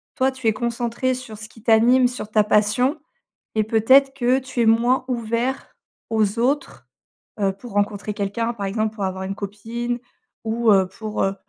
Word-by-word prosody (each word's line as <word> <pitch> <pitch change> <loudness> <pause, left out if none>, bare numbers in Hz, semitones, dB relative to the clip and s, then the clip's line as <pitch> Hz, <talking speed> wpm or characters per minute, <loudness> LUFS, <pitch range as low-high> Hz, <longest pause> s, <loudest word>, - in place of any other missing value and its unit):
toi, 260 +1 +2
tu 260 -3 -4
es 220 - +4
concentré 235 +2 -1
sur 230 -4 -9
ce 215 0 -9
qui 225 - -18
t'anime, 245 +3 +5
sur 245 -3 -6
ta 215 0 +4
passion 220 +7 +2 0.6
et 215 - +3
peut-être 260 +6 +4
que 255 -1 +2
tu 260 -2 -5
es - - +2
moins 240 +4 +3
ouvert 235 +2 -2 0.4
aux 220 -1 +1
autres, 270 +5 -1 0.5
heu, 195 -1 +2
pour 210 +4 -12
rencontrer 205 +1 -1
quelqu'un, 205 +4 -2
par 200 -3 -4
exemple, 215 +2 -1
pour 205 -3 -3
avoir 190 0 -3
une 195 +1 -3
copine 230 +4 -4 0.5
ou 225 0 +1
heu, 190 -1 +4
pour, 215 +3 -4
heu, 195 0 0
225 Hz, 180 wpm, -22 LUFS, 210-245 Hz, 0.6 s, t'anime